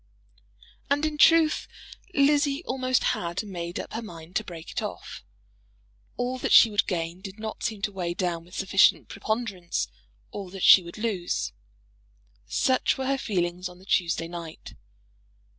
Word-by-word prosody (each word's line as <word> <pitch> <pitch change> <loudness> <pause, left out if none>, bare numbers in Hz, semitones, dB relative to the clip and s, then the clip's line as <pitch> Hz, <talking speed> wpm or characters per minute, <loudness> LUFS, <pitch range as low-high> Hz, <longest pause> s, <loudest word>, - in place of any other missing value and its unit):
And, 290 +2 +2
in 300 -1 -3
truth, 325 -1 +5 0.5
Lizzie 285 +1 +3
almost 255 -1 0
had 170 +3 -3
made 175 -3 -5
up - - -7
her 225 - -3
mind 170 -5 -11
to 215 - -1
break 165 -4 -9
it - - -2
off. - - -7 0.9
All 250 +1 -2
that - - -2
she 225 - +8
would 205 +1 +1
gain 170 -1 -3
did 195 0 -8
not 220 0 -6
seem 215 -3 -3
to 205 - 0
weigh 175 -3 -3
down 175 -3 -2
with 180 +2 -14
sufficient 195 0 +3
preponderance 205 -4 -2 0.4
all 195 -2 -6
that 190 0 -7
she 190 - +9
would 170 +2 -10
lose. 210 -6 -2 0.9
Such 260 -1 +1
were 265 - -3
her 275 +1 +1
feelings 180 -4 -2
on 180 - -14
the 185 - -17
Tuesday 170 -3 +1
night. 170 -2 -8
195 Hz, 160 wpm, -26 LUFS, 175-245 Hz, 0.9 s, she